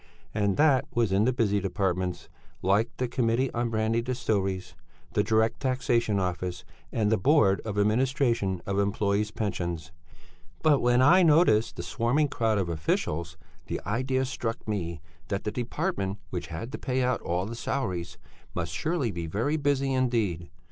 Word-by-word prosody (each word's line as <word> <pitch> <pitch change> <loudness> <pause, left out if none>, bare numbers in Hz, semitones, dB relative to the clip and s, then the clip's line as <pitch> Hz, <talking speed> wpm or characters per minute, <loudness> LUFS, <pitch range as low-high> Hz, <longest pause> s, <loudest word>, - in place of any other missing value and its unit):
And 100 -2 +1
that 140 -3 +4
was 115 -4 +2
in 100 +3 +3
the 130 - +3
busy 105 -5 +1
departments, 95 -2 -2 0.4
like 100 +5 +3
the 125 - 0
Committee 120 +1 +1
on 120 0 0
Brandy 110 +1 +1
Distilleries, 100 -7 -1 0.4
the - - +3
Direct 110 0 +2
Taxation 120 -5 +1
Office 90 -1 -3 0.3
and 110 -2 +1
The 110 - +3
Board 110 - +4
of 105 -2 -4
Administration 115 - +1
of 100 0 -2
Employés' 100 +1 +1
Pensions. 85 -7 -3 0.7
But 150 -3 +5
when 120 +1 +4
I 180 +7 +7
noticed 155 -9 +4
the - - -5
swarming 140 +6 +1
crowd 110 -4 +1
of 95 -3 0
officials, 80 0 -2 0.3
the - - -2
idea 130 +5 0
struck 115 -3 -4
me 85 -7 -3 0.3
that 100 -1 -2
the 105 - -2
department 100 -4 -2
which 90 -3 -4
had 85 +9 -6
to - - -5
pay 130 -1 0
out 125 -1 0
all 90 +2 -1
the 110 - -6
salaries 90 -8 -3 0.4
must 85 -2 -3
surely 155 - -1
be 85 -3 -4
very 115 - 0
busy 140 -2 +1
indeed. 115 -10 0
110 Hz, 160 wpm, -27 LUFS, 95-125 Hz, 0.7 s, I